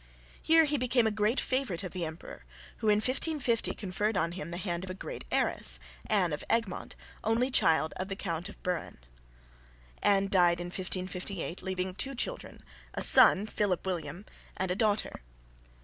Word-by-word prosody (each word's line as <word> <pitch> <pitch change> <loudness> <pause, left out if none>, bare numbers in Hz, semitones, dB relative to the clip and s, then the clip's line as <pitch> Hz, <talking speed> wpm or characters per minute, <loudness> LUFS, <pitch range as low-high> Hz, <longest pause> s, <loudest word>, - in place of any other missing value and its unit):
Here 325 0 +5
he 295 -1 0
became 245 -1 +2
a 220 - +2
great 215 +4 +1
favourite 255 -9 -1
of 185 - -5
the 180 -2 -3
emperor, 160 - -9 0.3
who 220 - -3
in 210 - +5
1550 255 +1 0
conferred 205 +2 -2
on 170 - 0
him 170 -2 -6
the 170 - -5
hand 175 -2 -3
of 190 - -7
a 185 - -5
great - - -7
heiress, - - +2 0.3
Anne 180 -6 +2
of 150 - -4
Egmont, 225 -6 -1 0.3
only 235 +4 +1
child 160 -8 +3
of 185 - -3
the 195 - -4
Count 175 -1 -4
of - - -14
Buren. 180 -2 -3 1.0
Anne 195 -1 +3
died 175 -3 +3
in 175 - -4
1558, 185 0 -3
leaving 185 0 -3
two 270 +8 0
children, - - -4 0.3
a - - +1
son, 195 +2 +7
Philip 205 -4 -1
William, 185 +1 -4 0.3
and 185 -1 -1
a - - 0
daughter. 215 - 0
195 Hz, 170 wpm, -30 LUFS, 180-225 Hz, 1.0 s, son